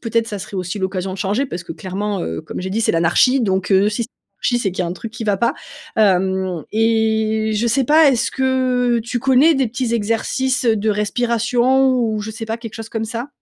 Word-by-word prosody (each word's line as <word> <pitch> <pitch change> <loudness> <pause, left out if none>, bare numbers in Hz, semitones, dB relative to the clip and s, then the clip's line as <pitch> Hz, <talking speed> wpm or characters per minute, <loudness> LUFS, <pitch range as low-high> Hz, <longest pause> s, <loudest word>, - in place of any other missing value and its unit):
peut-être, 230 0 +1
ça 205 -3 -5
serait 195 - -9
aussi 180 +2 -4
l'occasion 190 0 -2
de 195 - -9
changer 210 +8 0
parce 175 -8 -6
que - - -12
clairement, 190 +4 -4
heu, 80 - -4
comme - - -7
j'ai 190 +1 -4
dit, 220 +4 -1
c'est - - +2
«l'anarchie» 175 +11 +3
donc, 190 -4 0
heu, 195 +1 +4
si 215 +3 -2
c'est 230 - -6 0.3
l'anarchie, 245 - +2
c'est 200 -6 -1
qu'il 185 - -2
y - - -2
a - - -3
un - - -2
truc 220 +5 -8
qui 235 - -7
va 205 -2 +1
pas, 235 +4 +1 0.4
hem, 190 -4 +1
et 220 -1 +1
je 220 +3 0
sais 265 +3 +2
pas, 305 +3 +6
est-ce 245 -4 0
que 255 -2 +1
tu 245 0 -3
connais 270 +5 +4
des 265 -4 +1
petits 235 0 -2
exercices, 235 +4 0
heu, 230 -2 +4
de 215 +1 0
respiration 240 +4 +2
ou 220 -3 0
je 215 +1 -6
sais 225 +1 -6
pas 225 +1 -3
quelque 230 -2 -9
chose 225 -1 -7
comme 225 -1 -3
ça? 230 +4 -5
220 Hz, 235 wpm, -19 LUFS, 195-245 Hz, 0.4 s, pas